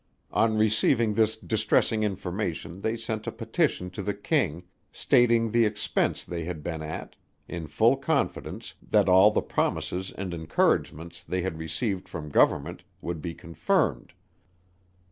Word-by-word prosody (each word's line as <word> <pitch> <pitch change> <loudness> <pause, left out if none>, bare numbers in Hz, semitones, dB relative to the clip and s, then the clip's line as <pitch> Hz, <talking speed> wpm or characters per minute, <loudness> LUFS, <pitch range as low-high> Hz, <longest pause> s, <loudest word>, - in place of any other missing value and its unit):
On 110 -1 +2
receiving 110 +1 +3
this 110 0 +2
distressing 110 0 +1
information 95 -2 -3
they 110 +2 -1
sent 110 -1 -4
a - - -1
petition 90 0 -1
to 95 - -6
the 100 +1 -2
King, 100 - 0 0.3
stating 115 -2 +3
the 115 +1 +4
expence 105 -1 0
they 85 -1 -5
had 85 -3 -5
been 80 -1 -4
at, 80 +1 -6 0.3
in 85 -3 -5
full 115 - +3
confidence, 140 +1 -2
that - - +2
all 95 +3 +7
the 105 - 0
promises 95 +1 -1
and 95 -2 -4
encouragements, 80 +1 0
they 90 -1 -2
had 90 -4 -3
received 90 +5 -3
from 75 -3 -6
Government, - - +2 0.2
would 85 -2 -5
be 85 0 -5
confirmed. 85 -7 -1
95 Hz, 145 wpm, -27 LUFS, 85-110 Hz, 0.3 s, all